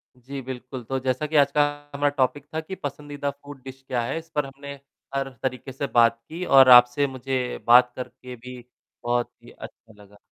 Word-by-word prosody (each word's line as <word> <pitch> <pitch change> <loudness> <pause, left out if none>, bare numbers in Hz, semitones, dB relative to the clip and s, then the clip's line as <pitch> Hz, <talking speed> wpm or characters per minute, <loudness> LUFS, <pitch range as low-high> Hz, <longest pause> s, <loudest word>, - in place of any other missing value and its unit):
जी, 135 +2 -8
बिल्कुल। 130 0 -8
तो 135 - -1
जैसा 130 +3 -1
कि 155 - -5
आज 140 -1 +4
का 150 - +3 0.3
हमारा 145 0 +2
टॉपिक 135 +2 0
था 160 - -1
कि 190 +4 -7
पसंदीदा 145 -3 -5
फ़ूड 140 -1 -13
डिश 135 0 -10
क्या 125 -2 -1
है। 140 - -3
इस 165 0 -16
पर 150 -1 +1
हमने 140 +1 -9 0.4
हर 135 0 -1
तरीके 130 0 -3
से 140 +2 -4
बात 115 -2 +3
की, 170 +3 -6
और 135 -3 +7
आपसे 125 +3 +7
मुझे 130 -1 -3
बात 125 +1 +7
करके 125 0 -8
भी 125 +2 -10 0.5
बहुत 120 0 -1
ही - - -14
अच्छा 110 -2 -13
लगा। 100 +1 -19
130 Hz, 200 wpm, -24 LUFS, 125-140 Hz, 0.5 s, और